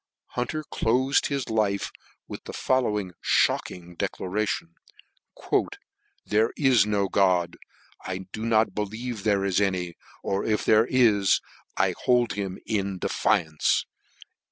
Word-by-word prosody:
Hunter 140 +6 -3
clofed 130 0 +1
his 140 -3 -2
life 105 -3 0 0.4
with - - -8
the - - -7
following 105 -7 0 0.4
mocking 90 -1 -6
declaration: 95 -1 -2 0.3
" - - -20 0.7
There 110 +2 +3
f* - - -10
is 130 -8 +4
no 100 -2 +1
God 90 -3 +2 0.5
1 95 0 -5
do 110 - -5
n 115 - -1
>L 110 +1 +5
believe 110 +1 -5
there 100 -2 +2
is 100 0 +1
any 90 -3 -1 0.3
or 95 0 -1
f - - -2
if 105 - 0
there 110 +2 +5
is, 110 -7 +4 0.4
I - - +2
hold 125 -1 +3
hkn 95 -2 -4
in 100 -3 -1
defiance." 80 -3 +1
105 Hz, 135 wpm, -26 LUFS, 95-115 Hz, 0.7 s, >L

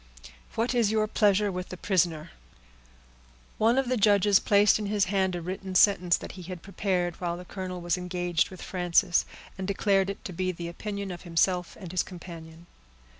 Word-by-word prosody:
What 230 +3 0
is 235 -4 +3
your 215 0 +2
pleasure 210 -1 +2
with 180 0 -5
the 185 - -7
prisoner?" 170 -4 0 1.3
One 230 +3 +3
of 270 -1 +1
the 255 0 +1
judges 205 -1 +4
placed 205 +1 +4
in 210 - -3
his 205 -1 +1
hand 190 -1 0
a 175 - -5
written 185 +1 -5
sentence, 180 -3 +4
that - - -8
he 185 - -10
had 180 0 -8
prepared 185 -3 -2
while 175 -1 -2
the 180 - -10
colonel 185 -1 -6
was 175 0 0
engaged 180 -2 -1
with 185 - -10
Frances, 180 0 +1 0.3
and 190 - -3
declared 195 -1 +2
it 200 - -7
to 185 - -5
be 185 +2 -1
the 170 -1 -6
opinion 200 +2 -5
of 175 - -7
himself 180 +1 0
and 180 -4 -8
his 185 - +1
companion. 170 -2 -10
185 Hz, 185 wpm, -27 LUFS, 175-200 Hz, 1.3 s, judges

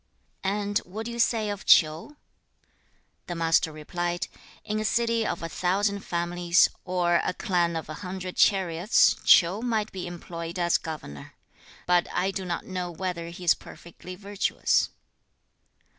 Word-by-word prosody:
3. 190 - 0
'And 205 0 -1
what 215 +5 -7
do 235 - -4
you 235 - -6
say 225 -2 +1
of 205 - -6
Ch'iu?' 160 - +4 1.1
The 175 - -4
Master 165 -1 +2
replied, 175 +3 -3 0.4
'In 215 0 -2
a - - -1
city 230 +1 +1
of 170 - -3
a - - -2
thousand 200 +5 0
families, 175 -1 +2 0.2
or 175 -2 +2
a - - -2
clan 175 -3 0
of 160 - -4
a 155 - -6
hundred 185 -1 -6
chariots, 185 0 +4
Ch'iu 180 +5 +5
might 220 -3 -1
be 185 -2 -5
employed 170 0 -7
as 175 -1 +2
governor, 110 - -8 0.5
but 175 -1 +3
I 185 +2 0
do 190 -1 -5
not 175 -2 -3
know 180 -2 -4
whether 175 -1 -4
he 175 +1 -10
is 170 - +5
perfectly 180 +2 -11
virtuous.' 200 +1 0
180 Hz, 155 wpm, -26 LUFS, 170-200 Hz, 1.1 s, Ch'iu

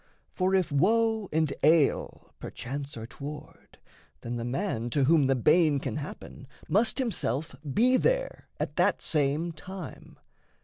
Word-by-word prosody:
For 185 +1 +1
if 180 -4 +1
woe 220 +7 +2
and 155 -2 +1
ail 155 -1 +2
Perchance 140 +1 -6
are 110 - -6
toward, 145 +5 -10 0.4
then 120 +1 -4
the 115 - -4
man 120 - -2
to 140 +4 +1
whom 150 0 +4
The 135 - +3
bane 150 +4 +4
can 130 -5 -4
happen 145 -2 -8 0.2
must 220 +4 +2
himself 160 - -2 0.2
be 250 - +4
there - - -1
At - - -4
that - - +2
same 150 +3 0
time. 175 0 -10
150 Hz, 140 wpm, -28 LUFS, 135-190 Hz, 0.4 s, whom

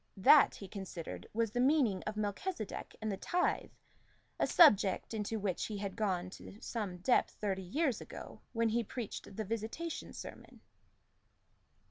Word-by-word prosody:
That, 275 +9 +7
he 195 - -8
considered, 190 -4 -7
was 225 -1 0
the 245 - -1
meaning 255 -7 +3
of 215 - -2
Melchisedec 215 - -3
and 215 - 0
the 195 - -3
tithe, 360 - 0 0.7
a - - +3
subject, 210 - +5
into 220 0 -2
which 195 -3 -1
he 215 - -4
had 200 -1 -4
gone 185 -4 -1
to 200 - -11
some 210 -7 -4
depth 215 +8 +2
thirty 195 -2 -2
years 255 - 0
ago, - - -9
when 230 -1 +1
he 235 +2 +1
preached 225 -3 -6
the 220 - -3
Visitation 230 - -4
sermon. - - -10
215 Hz, 150 wpm, -34 LUFS, 195-235 Hz, 0.7 s, That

